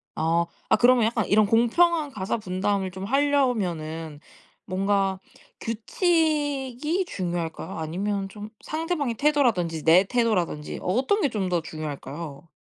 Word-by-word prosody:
아. 165 +1 +1 0.2
아 - - +6
그러면 245 -2 +5
약간 225 -2 0
이런 215 +1 +4
공평한 295 +9 +3
가사 195 -2 -2
분담을 190 -1 -1
좀 190 +1 -7
하려면은 195 - 0 0.5
뭔가 195 0 0 0.4
규칙이 295 - 0
중요할까요? 175 - -4
아니면 195 +5 -2
좀 210 +1 -9
상대방의 310 -6 -2
태도라든지 225 - +1
내 170 +4 +6
태도라든지 195 -10 -1
어떤 260 - +1
게 290 - +2
좀 195 -6 -2
더 175 -2 +1
중요할까요? 155 0 -7
205 Hz, 290 characters per minute, -25 LUFS, 175-265 Hz, 0.5 s, 아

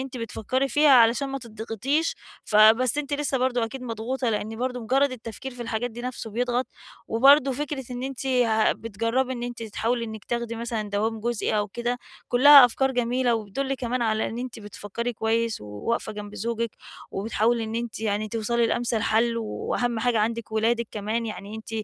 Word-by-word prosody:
أنتِ 265 -1 -6
بتفكري 245 +4 -2
فيها 295 +3 +4
علشان 245 +2 +5
ما 275 0 -3
تضغطيش، 230 +6 -2 0.3
فبس 225 +5 +5
أنتِ 290 -1 -3
لسه 285 -2 0
برضه 245 -2 +1
أكيد 255 +3 -7
مضغوطة 235 +2 -2
لإن 215 +1 -3
برضه 250 0 -2
مُجرد 265 +4 +2
التفكير 245 +2 -7
في 245 - -6
الحاجات 230 +1 -2
دي 235 - -8
نفسُه 250 -3 -5
بيضغط، 245 +3 0 0.4
وبرضو 270 +3 +5
فكرة 280 -1 -4
إن 245 0 -5
أنتِ 270 0 -5
ه 230 -4 +3
بتجربي 230 +4 -1
إن 240 -1 -5
أنتِ 240 -1 -5
تحاولي 230 +2 -1
إنِك 220 -2 -8
تاخدي 235 -1 -3
مثلًا 225 -3 -3
دوام 220 +2 -1
جزئي 225 -2 0
أو 205 0 -1
كده، 240 +3 -2 0.3
كُلّها 275 +2 +9
أفكار 265 +3 +1
جميلة 245 0 +1
وبتدُلّ 245 +6 -2
كمان 250 -1 -2
على 220 -1 +1
إن 230 - -6
أنتِ 250 -2 -6
بتفكري 210 +3 -5
كويس 225 0 0
وواقفة 105 - -3
جنب 210 0 -8
زوجك، 230 +2 -2 0.4
وبتحاولي 225 +3 0
إن 220 +1 -5
أنتِ 235 -2 -4
يعني 215 0 -1
توصلي 230 +1 +1
لأمثل 235 -2 0
حل، 230 +1 +2
وأهم 230 +1 -2
حاجة 235 -1 +1
عندِك 225 +1 -1
ولادِك 230 +1 +1
كمان، 220 +2 -2
يعني 210 0 -7
أنتِ 220 - -10
235 Hz, 175 wpm, -25 LUFS, 220-255 Hz, 0.4 s, كُلّها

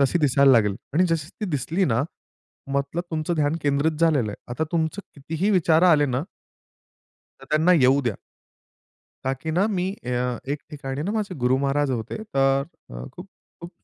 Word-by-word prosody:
तशी 140 +5 +3
दिसायला 140 -2 +5
लागेल 105 -4 +3 0.2
आणि 180 +3 +4
जशी 160 -2 -1
ती - - -1
दिसली 160 +6 0
ना 120 -2 +1 0.7
मतलब 140 +5 -1
तुमचं 160 +2 -1
ध्यान 150 +1 +1
केंद्रित 145 +2 +2
झालेलं 145 -10 +3
आहे. - - -7 0.2
आता 160 +6 -1
तुमचं 160 +3 0
कितीही 160 +7 -2
विचार 170 -4 +3
आले 145 -1 +4
ना 130 +2 -1 1.2
तर - - -13
त्यांना 160 +4 +4
येऊ 135 +2 +5
द्या. 115 - 0 1.1
ताकी 135 +4 -2
ना 180 +6 +2
मी 185 -1 -1 0.2
अ, 125 0 -1
एक 145 - -4
ठिकाणी 140 -1 -5
ना 195 - -2
माझे 210 -4 -2
गुरु 130 +1 +4
महाराज 140 0 +1
होते 115 -3 -3 0.2
तर 135 0 +3 0.5
खूप-खूप 180 -1 -13
145 Hz, 160 wpm, -24 LUFS, 135-165 Hz, 1.2 s, दिसायला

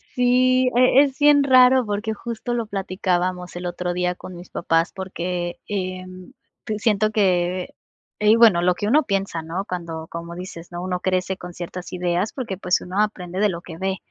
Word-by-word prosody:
Sí. 255 +1 +3
E 255 +2 +6
es 270 -2 -3
bien 290 -1 +6
raro, 255 -1 +6
porque 210 +1 -2
justo 235 +2 -5
lo 235 -1 -1
platicábamos 185 -2 -2
el 180 0 -6
otro 175 0 -3
día 180 0 -1
con 180 - -10
mis 175 +1 -11
papás, 165 0 0
porque, 180 -2 -4
em, 185 -2 -5 0.3
te 215 - -2
siento 215 -1 +2
que, 185 -3 +1 0.5
ey 210 +1 +5
bueno, 225 -7 +6
lo 180 0 +2
que 205 - -3
uno 300 +7 +4
piensa, 195 -7 -2
¿no? 170 +5 -4
Cuando, 165 -3 -5
como 170 0 -7
dices, 175 -1 -9
¿no?, 175 0 -5
uno 180 -1 -2
crece 185 +1 -1
con 180 0 -9
ciertas 175 +1 -7
ideas 180 +3 -1
porque, 225 -8 -4
pues, 180 -1 +1
uno 185 +3 -1
aprende 185 -4 -3
de 210 - +4
lo 170 -2 -5
que 165 -2 -10
ve, 190 +1 -2
185 Hz, 185 wpm, -22 LUFS, 180-215 Hz, 0.5 s, E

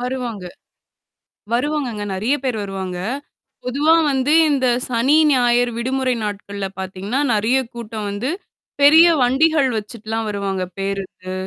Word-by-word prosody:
வருவாங்க! 245 -5 -4 1.1
வருவாங்கங்க. 250 -4 -1
நெறையா 225 +9 0
பேர் 250 -4 -1
வருவாங்க. 190 -2 -5 0.7
பொதுவா 285 +6 +2 0.2
வந்து 265 +2 0 0.2
இந்த 265 -3 +1 0.2
சனி, 255 +4 +2 0.2
ஞாயிறு 245 -1 +3
விடுமுறை 260 +1 0
நாட்கள்ல 200 -1 -4
பாத்தீங்கன்னா, 190 +6 -3
நெறையா 225 +5 +2
கூட்டம் 220 -3 -6
வந்து. 205 +6 -3 0.5
பெரிய 315 +4 +8
வண்டிகள் 280 +3 +3
வச்சுட்டுலாம் 220 0 -5
வருவாங்க 195 -2 -2
பேருந்து. 195 -1 -5
235 Hz, 110 wpm, -20 LUFS, 200-265 Hz, 1.1 s, பெரிய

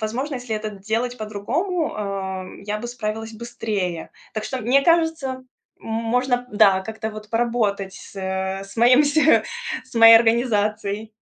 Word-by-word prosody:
возможно, 250 +7 -3
если 245 -3 -4
это 215 0 -4
делать 220 +5 -3
по-другому, 280 - -2
а, 195 -2 -4
м, 185 - -11
я 210 +1 -3
бы 235 - -6
справилась 225 -2 -5
быстрее. 215 -7 -4 0.2
Так 215 -1 -3
что, 260 - -3
мне 250 +4 +3
кажется, 325 -3 +2 0.5
м - - -19
можно, 245 +3 0
да, 195 -2 +5
как-то 220 +2 -5
вот 215 0 -10
поработать 220 -5 0
с - - -12
с 190 +1 -4
моим 245 +5 +6
с 290 - -1 0.7
с - - -18
моей 230 0 +9
организацией. 215 -2 +1
220 Hz, 150 wpm, -22 LUFS, 205-245 Hz, 0.7 s, моей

